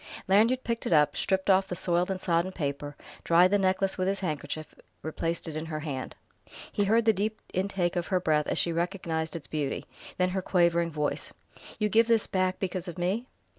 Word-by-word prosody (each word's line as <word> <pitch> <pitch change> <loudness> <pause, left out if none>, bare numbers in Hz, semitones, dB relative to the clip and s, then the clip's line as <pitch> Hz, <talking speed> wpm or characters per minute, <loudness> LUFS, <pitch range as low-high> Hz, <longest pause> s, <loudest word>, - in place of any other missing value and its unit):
Lanyard 225 +7 +4
picked 235 -1 -2
it - - +2
up, 150 -1 +4
stripped 190 -1 0
off 190 0 +4
the 180 - -4
soiled 175 +1 +1
and 190 -1 -2
sodden 175 0 +1
paper, 145 -3 -4 0.3
dried 175 +2 +5
the 205 - +4
necklace 190 0 +1
with 185 - +1
his 195 +1 -1
handkerchief, 155 -2 -4 0.3
replaced 165 +2 -2
it 160 - -5
in 155 +1 -4
her 155 -1 -4
hand. 140 -4 -5 0.6
He 205 - +1
heard 225 +3 +3
the 220 - +5
deep 215 +2 -2
intake 185 -2 0
of 175 -1 -1
her 185 -2 +1
breath 155 -4 +1
as - - -1
she 170 - +2
recognized 170 -2 -2
its 165 - -6
beauty, 150 -3 -3 0.3
then 180 0 +2
her 190 +1 -1
quavering 170 -2 +2
voice: 150 -2 -2 0.5
"You 210 - +1
give 225 +2 +4
this 230 -2 +3
back 185 -1 0
because 185 -1 -3
of 175 - -7
me...!" 195 +8 -1
180 Hz, 205 wpm, -28 LUFS, 165-195 Hz, 0.6 s, dried